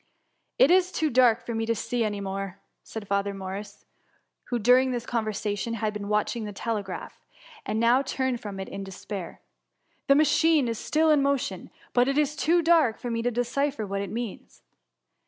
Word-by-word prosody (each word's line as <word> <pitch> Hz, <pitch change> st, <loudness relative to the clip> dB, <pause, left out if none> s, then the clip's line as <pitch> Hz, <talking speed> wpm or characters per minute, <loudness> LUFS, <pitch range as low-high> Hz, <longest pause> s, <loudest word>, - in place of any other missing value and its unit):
'^ -, -, +1 dB
*^ -, -, +10 dB
It 295 Hz, -, +2 dB
is 365 Hz, 0 st, +4 dB
too 310 Hz, -4 st, 0 dB
dark 240 Hz, -2 st, +4 dB
to 230 Hz, 0 st, -1 dB
see 230 Hz, +2 st, -1 dB
any 205 Hz, -2 st, -2 dB
more/' 195 Hz, -1 st, -4 dB, 0.3 s
said 220 Hz, -2 st, -8 dB
Fa 200 Hz, 0 st, +2 dB
ther 200 Hz, 0 st, -5 dB
Morris, 195 Hz, +2 st, -7 dB, 0.6 s
who, 245 Hz, -, -1 dB
during 250 Hz, +3 st, +4 dB
this 245 Hz, -2 st, -3 dB
conversation, 215 Hz, -1 st, -2 dB
had 215 Hz, -1 st, -2 dB
been 205 Hz, -1 st, -5 dB
watching 210 Hz, +2 st, 0 dB
the 210 Hz, -, -5 dB
telegraph, 200 Hz, -2 st, -5 dB, 0.4 s
and 215 Hz, +1 st, -1 dB
now 235 Hz, +3 st, +4 dB
turned 260 Hz, -3 st, -2 dB
from 200 Hz, -2 st, -6 dB
it 190 Hz, -, -5 dB
in 195 Hz, -, -6 dB
despair; 190 Hz, -1 st, -7 dB, 0.6 s
^^ -, -, -55 dB
the 275 Hz, -, +6 dB
machine 310 Hz, -1 st, +4 dB
is 230 Hz, -1 st, -3 dB
still 315 Hz, +1 st, +2 dB
in 295 Hz, -2 st, +4 dB
mo 280 Hz, 0 st, +3 dB
tion, 190 Hz, -7 st, -6 dB, 0.2 s
but 245 Hz, +1 st, +4 dB
it 275 Hz, +1 st, 0 dB
is 300 Hz, 0 st, +1 dB
too 330 Hz, +5 st, +2 dB
dark 320 Hz, -9 st, +4 dB
for 245 Hz, -, -5 dB
me 230 Hz, 0 st, -1 dB
to 245 Hz, -, +1 dB
decipher 245 Hz, +1 st, -1 dB
what 200 Hz, 0 st, -3 dB
it 200 Hz, -, -4 dB
means." 230 Hz, 0 st, -6 dB
230 Hz, 195 wpm, -26 LUFS, 205-265 Hz, 0.6 s, ^